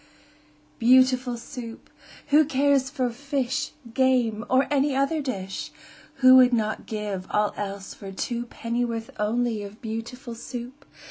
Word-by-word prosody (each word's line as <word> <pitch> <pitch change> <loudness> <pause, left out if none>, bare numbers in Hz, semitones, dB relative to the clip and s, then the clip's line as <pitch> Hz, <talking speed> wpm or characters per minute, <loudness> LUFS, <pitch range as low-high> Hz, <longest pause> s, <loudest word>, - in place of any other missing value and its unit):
Beautiful 255 0 +4
Soup! 230 -1 -9 0.4
Who 300 +2 +6
cares 275 -2 +2
for 255 -4 -1
fish, 270 0 -2 0.2
Game, 245 -4 +2
or 260 +1 +4
any 280 -1 +2
other 275 +3 +1
dish? 195 -9 -4 0.6
Who 255 0 +10
would 250 -1 +6
not 215 -2 -1
give 205 -4 -4
all 210 0 +1
else 200 -1 -5
for 195 -1 -9
two 240 +4 -3
Pennyworth 230 -1 -3
only 225 +1 0
of 205 +1 -9
Beautiful 230 +2 -6
Soup? 245 +3 -8
245 Hz, 130 wpm, -25 LUFS, 220-260 Hz, 0.6 s, Who